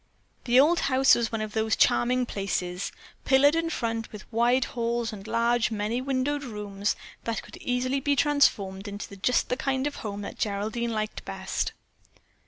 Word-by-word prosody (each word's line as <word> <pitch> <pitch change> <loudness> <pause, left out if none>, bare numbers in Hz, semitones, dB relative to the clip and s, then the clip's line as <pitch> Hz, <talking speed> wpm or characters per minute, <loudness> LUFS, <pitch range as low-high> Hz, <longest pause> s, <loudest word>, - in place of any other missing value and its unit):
The 245 +1 +5
old 325 +5 +5
house 265 0 +5
was 235 -1 +1
one 225 -1 -2
of 215 -1 -4
those 220 0 +1
charming 250 +1 +3
places, 185 -4 -3 0.3
pillared 280 +2 +5
in 330 0 0
front, 225 -6 -3
with 210 -3 -9
wide 245 +3 +3
halls 235 -1 -1
and 200 0 -9
large, 235 +1 +2
many 220 +3 -1
windowed 275 +2 -1
rooms 205 -4 -3 0.3
that 230 -1 -2
could - - -12
easily 255 +2 0
be 285 +1 +1
transformed 215 -9 +2
into 205 0 -7
just 245 +6 +1
the 250 - 0
kind 265 -1 -1
of 290 - -3
a - - -7
home 205 -2 -5
that 200 - -7
Geraldine 215 +3 -1
liked 215 -1 -3
best. 190 -1 -3
235 Hz, 175 wpm, -27 LUFS, 210-260 Hz, 0.3 s, The